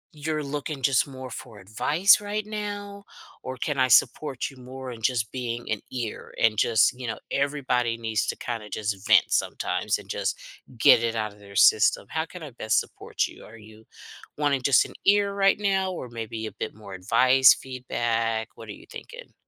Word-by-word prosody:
you're 155 0 -3
looking 145 0 -5
just 135 +1 +3
more 130 -2 -9
for 115 -2 -9
advice 150 - +3
right 205 +1 -3
now, 205 -1 -6 0.4
or 130 0 -6
can 140 +1 -2
I 130 - +4
support 130 +2 +2
you 135 - -17
more 130 +1 -8
in 115 -2 -10
just 115 -3 0
being 120 -3 -4
an 105 - 0
ear 120 -4 -5
and 115 -1 +3
just 115 +2 +3
you 125 -2 -6
know, 110 - -3
everybody 130 -5 0
needs 110 -2 -1
to - - -1
kinda 115 -3 -5
just 105 0 -4
vent 110 - +5
sometimes - - 0
and - - -13
just - - -2 0.4
get 115 - +6
it 115 0 -1
outta 105 -2 -3
their 100 -1 -14
system. 105 0 +5
How 160 0 -1
can 175 -1 -10
I 145 - -8
best 110 -2 +1
support - - -3
you? - - -14
Are 115 +1 -13
you 110 0 -16 0.5
wanting 145 -3 +1
just 135 -1 +5
an - - -11
ear 200 0 +4
right 195 0 +3
now 195 -2 +1
or 130 -9 -6
maybe 115 -1 -6
a - - -5
bit - - -6
more 105 -3 -11
advice, 125 +8 +5
feedback? 115 -3 -2
What 115 -1 -12
are - - -4
you - - -12
thinking? - - -11
125 Hz, 190 wpm, -25 LUFS, 110-150 Hz, 0.5 s, get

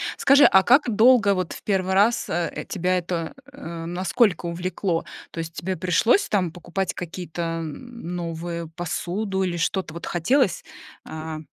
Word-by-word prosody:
Скажи, 280 +1 +6
а 190 - +6
как 275 +8 +5
долго 225 -3 +6
вот 185 -3 -2
в - - -11
первый 190 -2 0
раз, 210 +5 +3
э, 170 -1 -2
тебя 185 0 0
это, 170 -2 -3 0.2
э 170 -12 -7
насколько 180 +2 +1
увлекло? 175 0 -2 0.3
То 165 - -7
есть 165 0 -5
тебе 185 +4 -3
пришлось, 185 - +2
там, 185 -5 +1
покупать 175 +1 -3
какие-то, 175 -1 -6 0.2
м, 180 - -7
новые 170 0 -4
посуду 185 +4 -3
или 175 -2 -2
что-то 165 0 -1
вот 170 - -7
хотелось, 190 - +1 0.4
а, 155 0 -6
180 Hz, 150 wpm, -24 LUFS, 170-200 Hz, 0.4 s, Скажи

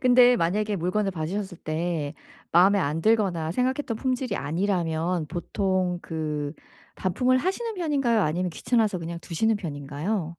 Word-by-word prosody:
근데 250 -1 +6
만약에 205 +4 0
물건을 190 +4 0
받으셨을 180 +2 -4
때 155 -2 -2 0.4
마음에 190 +4 +6
안 155 -1 0
들거나 195 -8 +2
생각했던 255 0 0
품질이 255 -4 -1
아니라면 170 0 0
보통 185 +1 -1
그 150 -3 -3 0.4
반품을 250 +8 +2
하시는 425 - -2
편인가요? 275 - +1
아니면 175 +3 0
귀찮아서 215 +1 +1
그냥 170 0 -5
두시는 215 +7 +1
편인가요? 155 +3 -3
185 Hz, 345 characters per minute, -26 LUFS, 165-225 Hz, 0.4 s, 근데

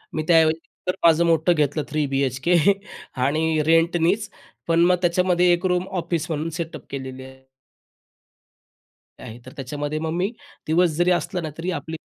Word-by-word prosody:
मी 155 - -1
त्या 170 - +6
ऐवजी 160 0 +1 0.3
तर 180 - 0
माझं 165 0 +5
मोठं 165 +1 +3
घेतलं 150 -1 0
3 150 0 0
बी-एच-के 135 +4 0 0.7
आणि 155 +2 +1
रेंटनीच. 170 +5 +2 0.4
पण 165 0 +2
मग 180 +1 +4
त्याच्यामध्ये 180 0 +2
एक 175 +2 -1
रूम 180 0 0
ऑफिस 170 -2 -2
म्हणून 160 0 -2
सेटअप 165 0 -6
केलेली 130 -1 -7
आहे. 130 0 -13 1.8
आहे. 115 +2 -9
तर 130 - -10
त्याच्यामध्ये 145 +3 -4
मग 160 0 -3
मी 185 +5 -1 0.4
दिवस 170 +3 +3
जरी 175 +1 +3
असला 180 +1 -1
ना, 160 - -4
तरी 175 +3 -3
आपली 160 0 -5
165 Hz, 160 wpm, -22 LUFS, 150-175 Hz, 1.8 s, त्या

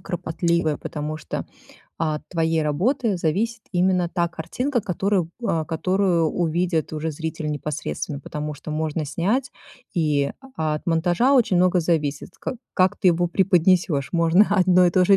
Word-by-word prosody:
кропотливая, 170 -2 -1
потому 150 +1 -5
что 155 - -5 0.5
от 155 -2 -1
твоей 165 -2 +1
работы 200 - +1
зависит 215 +8 -1
именно 180 -1 +2
та 175 -1 0
картинка, 240 - -2
которую, 190 -3 0 0.2
а, 160 -1 0
которую 175 +1 +1
увидит 170 -1 0
уже 155 +1 -2
зритель 160 0 -4
непосредственно, 145 - -4
потому 150 +1 -5
что 150 +2 -9
можно 155 0 -2
снять, 210 - -1 0.4
и 150 -5 +1 0.2
от 155 -1 -1
монтажа 175 +10 +2
очень 225 -8 +3
много 180 0 +4
зависит, 155 -4 -1
ка 255 - -4 0.2
как 185 -1 +3
ты 185 - +3
его 175 +1 +2
преподнесешь. 180 -5 +2
Можно 170 +4 +4
одно 185 -2 +5
и - - +3
то 185 +1 +3
же 195 +2 +6
170 Hz, 145 wpm, -23 LUFS, 155-185 Hz, 0.5 s, же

